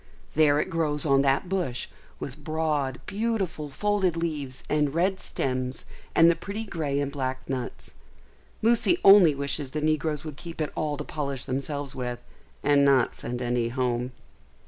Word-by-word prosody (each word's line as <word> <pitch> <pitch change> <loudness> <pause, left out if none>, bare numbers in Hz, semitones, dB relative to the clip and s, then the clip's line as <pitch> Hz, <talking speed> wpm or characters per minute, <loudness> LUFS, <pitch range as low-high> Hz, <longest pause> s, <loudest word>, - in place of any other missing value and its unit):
There 150 -1 +4
it - - -2
grows 155 -3 0
on 135 -2 +4
that 140 +5 +2
bush, 175 -10 -2 0.3
with - - -7
broad, 150 -5 -1
beautiful, 195 -8 -2
folded 195 +1 0
leaves 145 -6 -3
and 150 -1 +1
red 190 +3 +1
stems 130 0 -1 0.3
and 165 - +7
the 170 - +5
pretty 200 +6 -5
grey 150 -9 -2
and 140 -1 -1
black 130 -2 -3
nuts. 130 -2 -5 0.7
Lucy 235 +9 +5
only 195 -7 +8
wishes 140 0 -2
the 150 - -3
negroes 155 -1 0
would 155 -3 -7
keep 165 0 -8
it 155 - -2
all 150 -2 -2
to 150 - -4
polish 140 -4 -4
themselves 140 +1 -3
with, 125 -1 -4 0.4
and 145 -1 +4
not 135 -3 +4
send 125 +1 -5
any 120 -1 0
home. 125 0 -1
145 Hz, 160 wpm, -26 LUFS, 135-165 Hz, 0.7 s, only